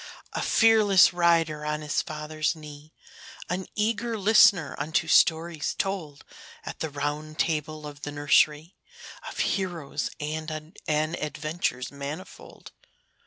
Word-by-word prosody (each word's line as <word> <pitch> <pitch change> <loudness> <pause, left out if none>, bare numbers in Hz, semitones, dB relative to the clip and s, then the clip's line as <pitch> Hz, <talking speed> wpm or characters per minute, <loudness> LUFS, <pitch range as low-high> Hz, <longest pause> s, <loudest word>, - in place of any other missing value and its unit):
A - - -2
fearless 215 -5 +5
rider 165 -3 +2
on 150 0 -2
his 150 -1 0
father's 155 +1 -3
knee, 150 -1 -12 0.6
An 185 +1 -3
eager 225 +2 -1
listener 205 -5 +5
unto 160 +3 0
stories 160 -1 +2
told 175 -7 -4 0.4
At - - -7
the 160 - -2
Round 150 +2 -4
Table 155 -1 -2
of 145 -1 -9
the 145 - -5
nursery, 150 +2 +2 0.5
Of - - -10
heroes 170 -7 -2
and 155 +1 -5 0.2
adventures 155 -2 -2
manifold. 145 +6 -9
155 Hz, 115 wpm, -26 LUFS, 150-175 Hz, 0.6 s, fearless